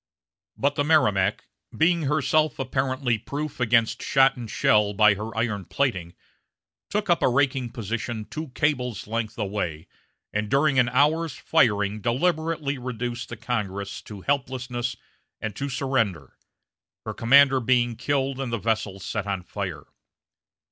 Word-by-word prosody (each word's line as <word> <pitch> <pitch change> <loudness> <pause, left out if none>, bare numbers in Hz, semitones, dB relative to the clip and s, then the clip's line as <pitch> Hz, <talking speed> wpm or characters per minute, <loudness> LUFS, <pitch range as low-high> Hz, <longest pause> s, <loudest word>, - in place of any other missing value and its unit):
But 140 +1 +1
the 145 - 0
Merrimac, 105 -11 +2 0.3
being 170 +1 +3
herself 155 +1 +2
apparently 130 -3 -1
proof 145 +5 -5
against 115 -2 +2
shot 135 0 +4
and 120 -3 -7
shell 105 -1 +3
by 105 +1 +6
her 110 +3 -6
iron 105 -5 -1
plating, 90 -12 -1 0.7
took 205 +1 -1
up 175 -3 +3
a - - +4
raking 130 -1 +1
position 115 -1 -4
two 155 +6 -6
cables' 125 -7 0
length 110 0 -3
away, 90 -6 -3 0.5
and 105 0 -1
during 140 0 +3
an 120 -1 +3
hour's 150 +4 +2
firing 105 -8 +1
deliberately 155 - 0
reduced 120 -1 -4
the 120 - -7
Congress 100 -4 -3
to 105 -3 -10
helplessness 125 -2 -2 0.4
and 110 -2 -4
to 140 +1 -3
surrender 115 - -1 0.7
her - - -4
commander 135 +3 +5
being 120 -1 +2
killed 135 +1 -1
and 135 -3 -3
the 115 - 0
vessel 105 -2 -1
set 100 +2 -4
on 95 -2 -2
fire. 95 -4 -5
120 Hz, 140 wpm, -25 LUFS, 105-140 Hz, 0.7 s, by